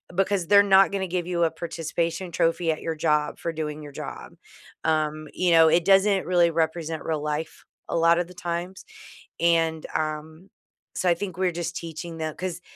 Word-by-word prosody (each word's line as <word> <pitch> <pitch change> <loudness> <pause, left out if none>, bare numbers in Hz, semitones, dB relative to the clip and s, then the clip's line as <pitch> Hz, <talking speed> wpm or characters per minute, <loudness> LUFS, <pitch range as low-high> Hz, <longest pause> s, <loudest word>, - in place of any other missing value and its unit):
because 195 -1 +1
they're 200 0 +7
not 195 -1 +5
gonna 190 -1 -2
give 175 -1 -2
you 175 -1 0
a 160 - 0
participation 170 +2 -3
trophy 165 0 +1
at 155 - -4
your 165 -1 -3
job 150 -1 0
for 170 - -3
doing 155 -1 -4
your 145 - -9
job. - - -8 0.5
Um, 155 -1 0
you 180 -1 +1
know, 165 -1 +7
it 170 +1 +3
doesn't 195 0 +4
really 175 -2 +4
represent 160 0 -2
real 155 -2 -1
life 150 +1 -4 0.3
a - - 0
lotta 170 +1 +4
the 180 - -14
times, 175 - -5 0.5
and, 165 -2 +2
um, 155 +3 -4 0.5
so 180 - +1
I 170 - +4
think 185 -1 -6
we're 185 -1 +1
just 170 0 -4
teaching 165 0 -6
them 155 -1 -4
'cause 180 -1 -5
170 Hz, 185 wpm, -25 LUFS, 160-180 Hz, 0.5 s, they're